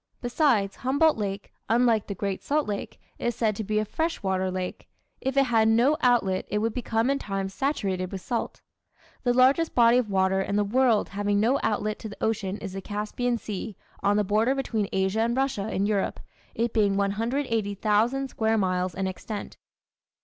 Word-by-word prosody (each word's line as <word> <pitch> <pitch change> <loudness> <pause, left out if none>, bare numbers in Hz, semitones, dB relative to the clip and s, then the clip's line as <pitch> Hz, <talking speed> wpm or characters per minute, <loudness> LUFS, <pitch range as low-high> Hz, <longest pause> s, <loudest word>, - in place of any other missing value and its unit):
Besides, 240 -6 +1
Humboldt 285 +5 +3
Lake, 200 -2 -4 0.2
unlike 230 -2 +3
the 200 - -4
Great 195 0 -3
Salt 300 +1 0
Lake, 205 -1 -5 0.2
is 240 -1 -1
said 220 -3 +1
to 220 - -4
be 215 +1 -1
a 215 - +1
fresh 320 +8 -2
water 190 -1 0
lake; 185 0 -5 0.3
if 265 +1 -2
it 275 - +6
had 225 -4 +3
no 235 +7 +4
outlet 215 -7 +2
it 210 - 0
would 220 +1 0
become 235 0 0
in 275 - 0
time 195 -3 -3
saturated 195 -6 -2
with 195 - -4
salt. 235 +4 -3 0.6
The 245 - +2
largest 265 +6 +3
body 235 0 +6
of 235 -4 -2
water 190 0 +2
in 200 - -2
the 210 - +3
world 235 +1 +2
having 205 0 0
no 245 +6 +2
outlet 215 0 -1
to 220 - -7
the 200 - -10
ocean 210 -3 -1
is 195 -3 -7
the 195 - -5
Caspian 215 +5 -2
Sea, 210 -1 -6 0.2
on 205 +1 +2
the 210 - +3
border 215 +6 +2
between 225 -7 -1
Asia 190 +3 0
and 235 +2 0
Russia 240 -6 -1
in 195 - 0
Europe, 205 -2 -1 0.4
it 230 0 -1
being 200 -3 +2
180,000 225 +2 0
square 220 -2 0
miles 185 -3 0
in 190 - -2
extent. 200 +3 -6
215 Hz, 185 wpm, -26 LUFS, 200-245 Hz, 0.6 s, it